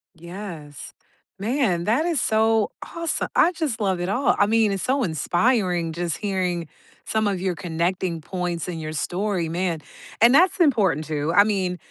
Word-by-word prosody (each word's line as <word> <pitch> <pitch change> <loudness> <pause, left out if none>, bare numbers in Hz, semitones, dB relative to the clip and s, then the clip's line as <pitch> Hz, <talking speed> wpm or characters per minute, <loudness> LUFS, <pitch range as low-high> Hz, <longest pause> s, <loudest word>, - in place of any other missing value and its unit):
Yes, 170 -4 -9 0.4
man, 210 -4 0
that 240 +10 +2
is 335 -5 0
so 220 -1 +2 0.2
awesome 335 -1 -2
I 350 - +5
just 315 -10 -3
love 190 -4 0
it 175 +1 -2
all. 250 +6 +2
I 205 - +4
mean, 220 -2 +3
it's 195 -2 -3
so 265 +1 +1
inspiring 175 - +1
just 170 0 -3
hearing 185 -5 -2 0.4
some 220 -1 0
of 195 -3 -1
your 185 -2 -1
connecting 170 0 -2
points 180 0 -3
in 175 -2 -4
your 155 0 -5
story, 180 +1 -2
man 170 -1 -2 0.4
And 235 +2 +7
that's 360 +7 +4
important 200 - +3
too, 150 +1 -2
I 200 - +8
mean, 190 -4 -1
190 Hz, 165 wpm, -23 LUFS, 170-220 Hz, 0.4 s, I